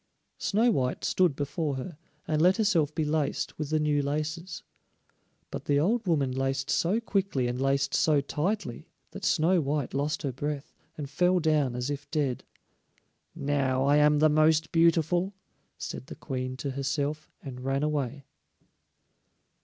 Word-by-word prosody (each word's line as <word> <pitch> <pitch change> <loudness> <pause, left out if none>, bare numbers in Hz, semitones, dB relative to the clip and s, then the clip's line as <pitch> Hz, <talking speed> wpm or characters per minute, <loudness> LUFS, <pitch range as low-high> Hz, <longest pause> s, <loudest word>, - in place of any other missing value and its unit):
Snow 225 +4 +2
white 130 - -1
stood 180 -6 +2
before 145 +1 -2
her, 145 +6 -6 0.3
and 155 -1 +1
let 180 +3 +5
herself 185 -9 +2
be 155 - 0
laced 150 -1 -1
with 150 -2 -3
the 155 0 +1
new 150 -1 +2
laces. 155 +5 -3 0.9
But - - -6
the 145 0 +2
old 215 +7 +1
woman 145 -6 +2
laced 135 +2 -1
so 190 +7 +2
quickly 195 - 0
and 125 +1 -3
laced 135 0 +1
so 150 -2 +3
tightly 150 - -3 0.2
that - - -9
Snow 170 +3 +3
white 145 -1 -2
lost 145 +2 -1
her 140 - -1
breath 145 +2 -4 0.2
and 145 -2 -4
fell 180 +5 +2
down 150 -6 +1
as 125 +3 -2
if 140 - -6
dead. 140 -5 -1 0.9
"Now 140 -3 0
I 145 +1 +4
am 150 0 +5
the 155 +1 +5
most 155 +1 +3
beautiful," 170 +3 +2 0.4
said 130 - -6
the - - -8
Queen 130 -2 -4
to 140 +1 -3
herself, 140 +3 -2
and 125 -3 -7
ran 135 +2 0
away. 140 -2 -2
150 Hz, 155 wpm, -28 LUFS, 135-165 Hz, 0.9 s, let